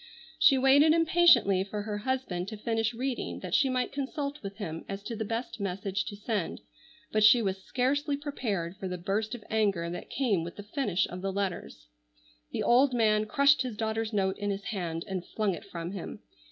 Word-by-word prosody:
She 280 -4 +6
waited 280 +4 +6
impatiently 325 - +5
for 205 +1 -5
her 210 -1 -3
husband 230 -7 -2
to 215 - -6
finish 225 +1 0
reading 250 +2 -3
that - - -6
she 275 -4 +4
might 255 -1 0
consult 280 +1 -4
with 200 -1 -7
him 165 -6 -5
as 195 0 -5
to 230 - -5
the 220 - -3
best 230 +2 -4
message 195 +1 -2
to 205 - -6
send, 205 -3 -3 0.5
but 215 0 +2
she 225 +3 +8
was 190 -1 -2
scarcely 280 +5 0
prepared 210 - -3
for 190 - -5
the 180 0 -4
burst 210 +6 -2
of 225 - -10
anger 200 -6 +1
that 175 - -7
came 220 -11 0
with 170 - -7
the 205 - -8
finish 205 - 0
of 180 +1 -7
the 195 0 -2
letters. 185 - -4 0.7
The - - -2
old 255 +2 +4
man 215 -2 +3
crushed 280 +5 +4
his 250 -5 -4
daughter's 220 0 -1
note 190 -3 0
in 205 0 -2
his 200 0 -3
hand 170 -6 -3
and 190 -2 -3
flung 210 0 -1
it 200 - -8
from 170 -3 -6
him. 195 -3 -7
215 Hz, 200 wpm, -29 LUFS, 195-255 Hz, 0.7 s, she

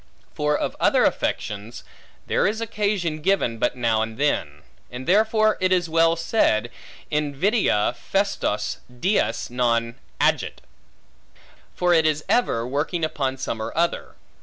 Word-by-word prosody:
For 150 0 0
of - - -3
other - - +3
affections, 105 +2 -2 0.4
there - - +1
is 215 +2 -1
occasion 205 -8 -1
given, 150 -11 +1
but 120 - 0
now 115 -3 +1
and 110 0 -4
then; 75 - -1 0.3
and 125 +1 -7
therefore 215 - +3
it 185 0 +2
was 175 -2 +2
well 165 0 +4
said, 120 - +1 0.4
Invidia 150 - +1
festos - - -1
dies 125 - -1
non 115 -1 +1 0.3
agit: - - +1 1.1
for 180 -1 +2
it 160 -2 +4
is 155 0 -1
ever 115 - +1
working 155 +5 -1
upon 135 -4 -2
some 115 -3 -4
or - - -4
other. 170 +1 -1
150 Hz, 135 wpm, -23 LUFS, 120-185 Hz, 1.1 s, well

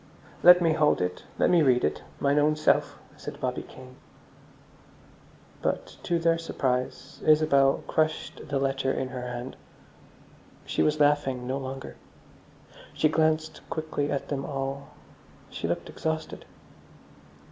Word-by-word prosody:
"Let 180 0 +8
me 165 -1 +3
hold 150 -1 +3
it. 90 0 -3
Let - - +3
me 175 -2 +5
read 125 -4 +3
it, 75 - 0 0.2
mine 140 +1 +3
own 150 +1 +3
self," 155 - +2 0.2
said - - -8
Bobby - - -2
Kane. 130 0 -14 1.6
But, - - -2
to 170 - 0
their 165 0 +2
surprise, 130 -3 -3
Isabel 150 -3 +4
crushed 155 0 -1
the 140 - 0
letter 135 0 0
in 130 -1 -2
her 130 -1 -6
hand. 125 +1 -6 1.1
She - - -1
was 150 0 +2
laughing 145 -4 +2
no 130 +2 -2
longer. 135 0 -7 1.0
She 155 - +3
glanced 155 0 +1
quickly 155 -2 -2
at 140 - -3
them 135 -2 -2
all; 140 0 -4 0.6
she - - -4
looked - - -2
exhausted. 160 0 -4
145 Hz, 135 wpm, -27 LUFS, 130-155 Hz, 1.6 s, Let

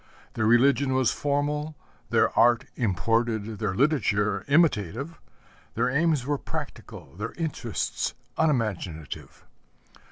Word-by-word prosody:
Their 110 - 0
religion 130 +3 +4
was 130 -3 +3
formal, 150 +2 -1 0.3
their - - +2
art 120 0 +4
imported, 110 +1 0
their 105 -4 -1
literature 105 -6 +1
imitative, 140 - +1 0.6
their 125 +2 +1
aims 150 -2 +2
were 145 0 -1
practical, 70 - -7
their 105 +3 -4
interests 150 -9 -3 0.2
unimaginative. 105 - -2
120 Hz, 100 wpm, -26 LUFS, 110-145 Hz, 0.6 s, religion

